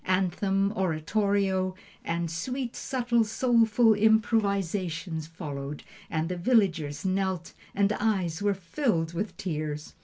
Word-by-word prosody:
Anthem, 195 +2 +1
oratorio, 190 +2 +1 0.3
and 170 0 -2
sweet, 250 +9 -3
subtle, 240 -3 +1
soulful 225 0 +4
improvisation 200 -6 +1
followed, 150 -3 -6 0.3
and 160 0 -1
the 180 +1 -3
villagers 170 - +1
knelt, 190 -2 -1 0.2
and 200 +1 +3
eyes 190 -7 0
were 205 -1 +2
filled 175 - -1
with 200 +5 -3
tears. 155 -3 -4
190 Hz, 110 wpm, -28 LUFS, 165-215 Hz, 0.3 s, soulful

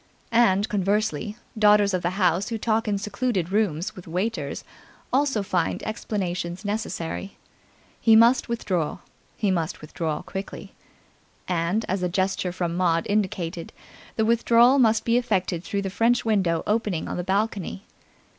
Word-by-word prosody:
And, 210 -3 +4
conversely, 210 +2 -1 0.2
daughters 210 -2 +4
of 185 - 0
the 175 - 0
house 185 +1 +2
who 230 - -2
talk 225 +1 0
in 205 -1 +1
secluded 200 -3 -2
rooms 200 -2 0
with 180 - -11
waiters 190 +8 -3 0.5
also 265 -6 +2
find 180 -4 -1
explanations 185 -4 -3
necessary. 200 -3 -4 0.6
He 225 -1 +5
must 235 +3 +5
withdraw. 185 -9 -1 0.4
He 205 -3 +1
must 170 -2 -2
withdraw 155 0 -4
quickly. 195 0 -7 0.7
And, 180 +5 0
as 190 +1 -1
a 180 - 0
gesture 190 0 -1
from 175 -1 -2
Maud 170 -2 +1
indicated, 185 -5 -2 0.4
the 220 - +1
withdrawal 235 +3 +5
must 225 -3 +3
be 235 +1 +3
effected 190 -7 -1
through 200 +1 -2
the 195 - -2
french 235 +4 +2
window 190 -7 +1
opening 210 -6 -1
on - - -4
the 180 - -2
balcony. 195 0 -2
200 Hz, 145 wpm, -24 LUFS, 180-220 Hz, 0.7 s, He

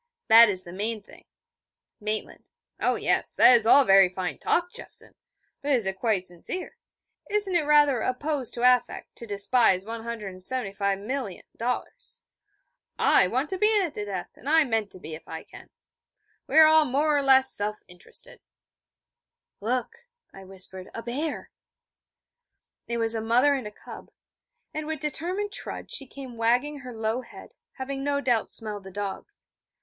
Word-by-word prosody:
That 230 0 +9
is 185 -2 +2
the 175 - -10
main 215 +2 -3
thing.' - - -17 0.7
Maitland: 215 0 -4 0.3
'Oh - - +1
yes, - - +1
that's 235 -3 +7
all 275 +3 +7
very 195 -3 +6
fine 180 -4 -5
talk, 355 +2 0
Jeffson! 485 - -9 0.5
But 285 0 0
is 240 -6 +2
it 190 0 -2
quite 210 -5 0
sincere? 180 - -4 0.5
Isn't 410 -2 +1
it 315 -4 +1
rather 295 -4 +5
a 255 +3 -1
pose 285 -2 -2
to 235 - -4
affect 250 -1 +2
to 235 - -9
despise 200 -1 +2
$175,000,000? 225 - -4 0.8
I 190 - +4
want 260 +9 -1
to 375 - -3
be 425 0 +4
in 400 - +3
at 335 - -4
the 210 - -4
death, 190 -3 -5
and 275 - -8
I 320 +1 +5
mean 225 -5 -1
to 190 - -11
be, 160 -3 -9
if 155 +1 -10
I 160 0 -7
can. - - -15 0.8
We - - 0
are 320 - +10
all 315 0 +6
more 295 +3 +1
or 285 - +2
less 265 -1 +5
self 210 +1 -1
interested.' 180 0 -8 1.2
'Look,' 255 - -3 0.3
I 195 0 -12
whispered 190 0 -5
'a 230 - -6
bear.' 285 +6 -4 1.4
It 235 - -2
was 225 -1 +3
a 225 - -2
mother 245 +6 +3
and 255 -7 -4
cub: - - -12 0.6
and 310 0 -4
with 315 -1 -4
determined 355 +8 -3
trudge - - -8
she 275 - -3
came 260 -3 -10
wagging 250 +6 +1
her 250 -2 -9
low 220 +2 -2
head, 245 - -14 0.2
having 270 0 -5
no 285 0 0
doubt 245 -5 0
smelled 210 -2 -3
the - - -8
dogs. 205 - -7
235 Hz, 160 wpm, -26 LUFS, 205-285 Hz, 1.4 s, are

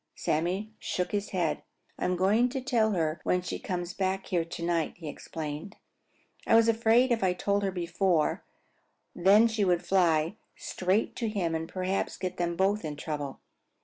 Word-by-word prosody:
Sammy 185 +7 -1
shook 180 -1 -2
his 205 0 -2
head. 175 -4 -1 0.4
"I'm 180 - 0
going 210 +7 +3
to 265 +2 -3
tell 235 -5 +1
her 160 -3 0
when 180 0 +1
she 175 - -4
comes 175 -1 -4
back 190 0 -1
here 175 -2 0
to 170 0 -6
night," 170 -2 0
he 165 -3 -8
explained. 155 +5 -6 0.7
"I - - +5
was 225 0 +6
afraid 230 +3 +4
if 230 -4 +1
I 185 -1 +3
told 200 +2 0
her 200 - 0
before 180 -2 0 0.7
then 200 +6 +5
she 220 -2 0
would 175 -2 +1
fly 170 0 +2 0.2
straight 190 +4 -1
to 230 -3 -1
him 185 -6 -1
and 160 0 -3
perhaps 185 +1 -2
get 185 -1 -4
them 170 -1 -1
both 195 +4 +1
in 150 -2 -4
trouble." 145 -2 -5
185 Hz, 175 wpm, -29 LUFS, 170-205 Hz, 0.7 s, was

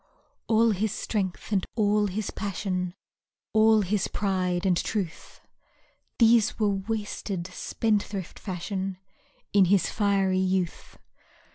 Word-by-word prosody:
All 225 0 +4
his 210 +1 0
strength 200 -3 -3
and 195 -3 +2
all 210 -1 +2
his 200 +2 -3
passion, 185 -3 -3 0.6
All 220 0 +5
his 200 0 0
pride 185 -2 -1
and 185 -2 +3
truth, 185 -1 -4 0.8
These 230 -2 +4
were 210 -2 +2
wasted, 200 -2 -3
spendthrift 205 -3 -2
fashion, 190 0 -4 0.6
In 200 -2 +6
his 195 +1 +2
fiery 195 -3 +2
youth. 185 -2 -1
200 Hz, 110 wpm, -27 LUFS, 185-215 Hz, 0.8 s, In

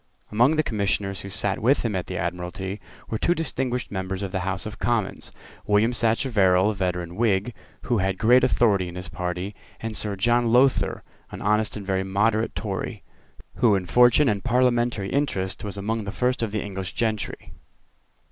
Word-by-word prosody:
Among 120 +8 +4
the 155 - +2
commissioners 100 -4 -1
who 100 - -8
sate 100 0 0
with 130 +6 +3
him 110 -4 -1
at 90 - -3
the 90 - -4
Admiralty 90 +3 -4 0.3
were 110 - -1
two 175 - +2
distinguished 130 -6 -2
members 95 0 -3
of 95 - -4
the 95 - -1
House 95 -1 -3
of 105 - -7
Commons, 115 -5 -1 0.4
William 105 +4 +3
Sacheverell, 110 -5 +3
a - - -3
veteran 90 -3 -3
Whig, 110 +1 +1 0.3
who 120 -4 +1
had 95 0 0
great 120 +4 +5
authority 105 -7 +3
in 90 - -8
his 90 -2 -7
party, 90 +2 -4 0.3
and 115 -1 -5
Sir 105 -2 0
John 120 +3 +2
Lowther, 130 +2 +3 0.3
an - - -8
honest 105 +1 +1
and 100 - -7
very 95 0 0
moderate 105 +4 +1
Tory, 100 -3 -4 0.5
who 110 -4 +4
in 95 -2 -1
fortune 120 - +5
and 105 -4 0
parliamentary 120 -4 +1
interest 100 -10 -1
was 100 -1 -5
among 110 +2 -2
the 100 - -4
first 125 +3 0
of 115 -3 -1
the 110 - -2
English 95 -2 -5
gentry. 110 -4 -3
105 Hz, 180 wpm, -24 LUFS, 95-120 Hz, 0.5 s, great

